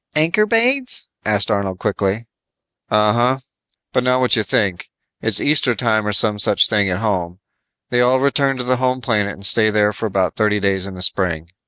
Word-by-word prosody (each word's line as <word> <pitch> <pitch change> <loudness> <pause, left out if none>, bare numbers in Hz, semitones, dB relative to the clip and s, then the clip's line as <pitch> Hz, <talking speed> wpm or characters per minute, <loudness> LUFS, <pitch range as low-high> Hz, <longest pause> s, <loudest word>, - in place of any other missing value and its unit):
"Ankorbades?" 225 - +1 0.2
asked 105 0 +1
Arnold 100 -2 -2
quickly. 100 +2 -2 0.6
"Uh 105 0 +2
huh. 125 +3 +1 0.5
But 125 - +1
not 125 0 +2
what 125 -1 +2
you 110 - +1
think. 95 -3 -1 0.3
It's 110 -3 +4
Easter 140 -5 +2
time 110 -1 0
or - - 0
some 105 0 +1
such 100 - +4
thing 105 -2 +1
at 90 - -1
home. 90 -4 -3 0.5
They 120 - +1
all 125 +1 +3
return 140 0 +1
to 125 - -4
the 125 +1 0
home 130 0 -1
planet 105 -4 -1
and 100 - -11
stay 110 +1 +3
there 105 0 +1
for 110 - -4
about 95 -3 -1
thirty 105 -1 0
days 95 -1 -1
in 95 - -8
the 90 - -2
spring. 85 -3 -1
105 Hz, 190 wpm, -18 LUFS, 100-125 Hz, 0.6 s, It's